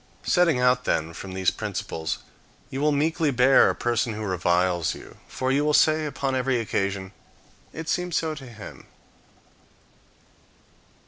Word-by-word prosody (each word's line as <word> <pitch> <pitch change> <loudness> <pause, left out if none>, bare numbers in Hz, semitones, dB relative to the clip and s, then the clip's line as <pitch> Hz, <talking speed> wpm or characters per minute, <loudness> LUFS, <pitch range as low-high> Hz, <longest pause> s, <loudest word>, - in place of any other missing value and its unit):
Setting 170 -7 +3
out, 125 0 +3
then, 80 +1 0
from 95 +2 -8
these 95 -1 +2
principles, 80 -1 -4 0.5
you 135 - -3
will 150 +1 +3
meekly 155 +2 +1
bear 130 0 +5
a - - -1
person 120 -1 0
who 110 +1 -5
reviles 90 -2 +1
you, - - -13
for 130 0 -2
you 140 +2 +2
will 150 0 +2
say 155 0 +3
upon 135 -1 -2
every 130 -1 +1
occasion, 100 -3 -2 0.6
"It 160 0 -7
seemed 180 0 -1
so 160 -1 0
to 140 -4 -10
him." 110 -4 -11
125 Hz, 145 wpm, -25 LUFS, 95-150 Hz, 0.6 s, bear